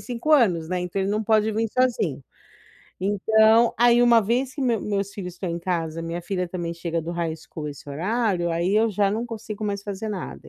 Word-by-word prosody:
5, 250 Hz, +5 st, -2 dB
anos, 185 Hz, -, +4 dB
né, 180 Hz, -1 st, -1 dB
então 180 Hz, +2 st, -3 dB
ele 195 Hz, -, -1 dB
não 215 Hz, +1 st, 0 dB
pode 220 Hz, 0 st, +3 dB
vir 225 Hz, +1 st, 0 dB
sozinho. 230 Hz, -, 0 dB, 0.8 s
Então, 220 Hz, +4 st, +4 dB
aí, 240 Hz, 0 st, +5 dB
uma 235 Hz, -1 st, +6 dB
vez 250 Hz, +5 st, -1 dB
que 280 Hz, -, -3 dB
meus 235 Hz, -4 st, +1 dB
meus 200 Hz, -1 st, -2 dB
filhos 180 Hz, -3 st, -6 dB
estão 180 Hz, -1 st, -4 dB
em 170 Hz, -, -3 dB
casa, 165 Hz, -2 st, -2 dB
minha 170 Hz, +1 st, -4 dB
filha 180 Hz, 0 st, -2 dB
também 170 Hz, -2 st, -4 dB
chega 170 Hz, 0 st, -3 dB
do 165 Hz, -, -5 dB
high 170 Hz, -2 st, -2 dB
school 155 Hz, -1 st, -8 dB
nesse 145 Hz, -1 st, -9 dB
horário, 180 Hz, +3 st, 0 dB
aí 175 Hz, +4 st, 0 dB
eu 225 Hz, +1 st, +4 dB
já 200 Hz, 0 st, +1 dB
não 225 Hz, +4 st, -2 dB
consigo 220 Hz, -2 st, -6 dB
mais 200 Hz, -1 st, -2 dB
fazer 205 Hz, +1 st, -5 dB
nada. 200 Hz, -3 st, -6 dB
200 Hz, 210 wpm, -24 LUFS, 175-225 Hz, 0.8 s, uma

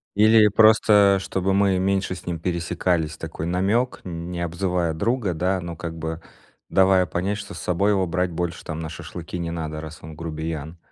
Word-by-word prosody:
Или 110 Hz, +1 st, +6 dB
просто 105 Hz, -2 st, +5 dB
чтобы 95 Hz, 0 st, -1 dB
мы 100 Hz, -1 st, +3 dB
меньше 95 Hz, 0 st, 0 dB
с -, -, -12 dB
ним 85 Hz, -2 st, -3 dB
пересекались, 85 Hz, -2 st, -1 dB
такой 80 Hz, -1 st, -6 dB
намек, 100 Hz, +8 st, 0 dB
не 85 Hz, 0 st, -5 dB
обзывая 85 Hz, -1 st, -1 dB
друга, 105 Hz, +2 st, 0 dB
да, 90 Hz, +4 st, 0 dB
но 85 Hz, -1 st, -6 dB
как 80 Hz, 0 st, -6 dB
бы 80 Hz, +1 st, -4 dB, 0.5 s
давая 95 Hz, -1 st, +4 dB
понять 95 Hz, +5 st, -2 dB
что 100 Hz, 0 st, -8 dB
с -, -, -8 dB
собой 100 Hz, +4 st, +1 dB
его 95 Hz, -3 st, +1 dB
брать 90 Hz, +1 st, 0 dB
больше, 85 Hz, 0 st, -3 dB
там, 80 Hz, 0 st, -5 dB
на 80 Hz, -, -4 dB
шашлыки 85 Hz, +2 st, -7 dB
не 85 Hz, -1 st, -3 dB
надо, 80 Hz, -2 st, -4 dB
раз 80 Hz, 0 st, -9 dB
он 80 Hz, 0 st, -9 dB
грубиян. 80 Hz, 0 st, -5 dB
90 Hz, 180 wpm, -23 LUFS, 80-95 Hz, 0.5 s, Или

